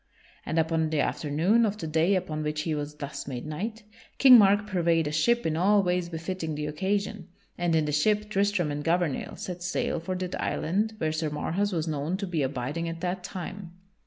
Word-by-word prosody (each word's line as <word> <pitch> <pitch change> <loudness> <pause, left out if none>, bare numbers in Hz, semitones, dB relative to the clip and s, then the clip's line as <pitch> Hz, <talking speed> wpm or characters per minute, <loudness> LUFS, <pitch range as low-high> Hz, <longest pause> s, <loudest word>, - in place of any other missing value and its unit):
And 160 - -1
upon 160 0 +1
the 155 -1 0
afternoon 165 +12 +2
of 210 -2 0
the 190 - -5
day 160 +5 +2
upon 160 -4 -2
which 150 0 -2
he 155 0 -2
was 150 0 -4
thus 140 -1 -6
made 125 -2 -5
knight, 215 +9 -5 0.3
King 260 -2 +9
Mark 205 -2 +6
purveyed 170 -5 +1
a 150 - -2
ship 235 +10 +2
in 160 -1 0
all 200 +4 +4
ways 180 -1 0
befitting 165 -1 -4
the 150 0 -3
occasion, 195 +4 -2 0.3
and 175 -2 0
in 155 -1 +2
the 150 - -1
ship 210 +8 +2
Tristram 200 -5 +1
and 145 0 -3
Gouvernail 170 -3 0
set 180 -1 -6
sail 175 -1 -1
for 185 +3 -4
that 180 0 -4
island 210 +6 -1
where 155 -4 0
Sir 155 0 -1
Marhaus 175 +7 -1
was 165 -3 -1
known 155 +4 -2
to 200 - -3
be 170 -5 -1
abiding 140 +5 -2
at 165 0 -6
that 180 0 -2
time. 185 -1 -7
170 Hz, 205 wpm, -27 LUFS, 155-195 Hz, 0.3 s, King